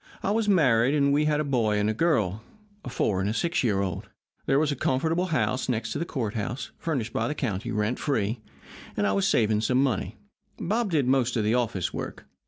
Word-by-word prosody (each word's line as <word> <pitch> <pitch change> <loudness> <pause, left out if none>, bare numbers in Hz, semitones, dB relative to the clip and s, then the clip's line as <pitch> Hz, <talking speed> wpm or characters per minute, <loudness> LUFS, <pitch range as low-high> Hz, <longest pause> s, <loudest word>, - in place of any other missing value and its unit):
I 195 - +1
was 215 0 +1
married, 135 - +4
and 140 -1 +3
we 150 +1 +3
had 150 -1 +2
a - - +1
boy 115 -7 +1
and 105 0 +1
a 110 - +1
girl 110 - +1 0.4
a - - -6
four 100 -5 0
and 100 - 0
a 110 - -2
six 170 +2 0
year 100 -5 +1
old. 95 -3 -4 0.4
There 135 - +3
was 150 0 +2
a - - -1
comfortable 160 +8 0
house 145 -6 0
next 110 -2 -1
to - - -2
the 170 - -1
courthouse, 115 -3 -3
furnished 130 -9 -2
by - - 0
the 150 - -3
county, 110 -5 -3
rent 105 +2 -1
free, 110 -5 -1 0.6
and 105 - +1
I 100 - +2
was 100 0 +2
saving 110 -2 +2
some 125 +3 +1
money. 110 -5 -1 0.4
Bob 220 +4 -1
did 150 -6 +2
most 125 -2 +2
of 110 - +1
the 105 +2 +2
office 115 -7 -1
work. - - -6
125 Hz, 220 wpm, -26 LUFS, 105-150 Hz, 0.6 s, married